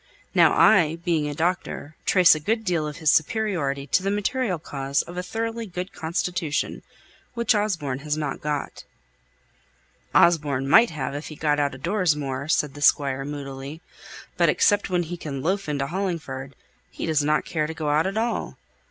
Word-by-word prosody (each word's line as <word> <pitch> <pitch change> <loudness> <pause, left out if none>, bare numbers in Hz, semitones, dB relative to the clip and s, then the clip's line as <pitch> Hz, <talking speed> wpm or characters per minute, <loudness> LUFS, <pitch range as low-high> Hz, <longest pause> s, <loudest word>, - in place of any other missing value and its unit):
Now - - +5
I, 165 -7 +5
being 165 -3 -1
a 145 - -5
doctor, 165 -2 -2
trace 185 -3 +6
a 155 - -2
good 220 +8 -1
deal 170 -5 0
of 150 +1 -7
his 160 -3 +3
superiority 160 -7 0
to 145 - +2
the 195 - -1
material 205 0 -1
cause 140 -3 -2
of 175 - -10
a 180 - -2
thoroughly 225 +4 -4
good 180 +1 -6
constitution, 170 -1 -2 0.5
which 235 0 +2
Osborne 170 -11 -1
hasn't 150 -1 -3
got." 150 -1 -4 1.3
"Osborne 145 -6 +3
might 225 +11 +6
have, 140 -4 -4
if 145 +2 -5
he 155 - -8
got 150 -1 +1
out 140 -2 0
o' - - -9
doors 175 +2 +1
more," 140 -1 -4
said 150 -3 +1
the 145 - -10
Squire, 135 -2 +3
moodily; 140 +1 -7 0.5
"but - - +4
except 205 -1 +2
when 180 -1 +1
he 175 +2 -6
can 140 -5 -6
loaf 190 +1 -1
into 140 -2 -1
Hollingford 155 -7 -4 0.3
he - - -6
doesn't 150 -1 +1
care 155 -2 -1
to 160 - -5
go 155 -2 -2
out 155 +4 +2
at 195 +2 -3
all. 230 +2 -2
155 Hz, 175 wpm, -24 LUFS, 145-185 Hz, 1.3 s, trace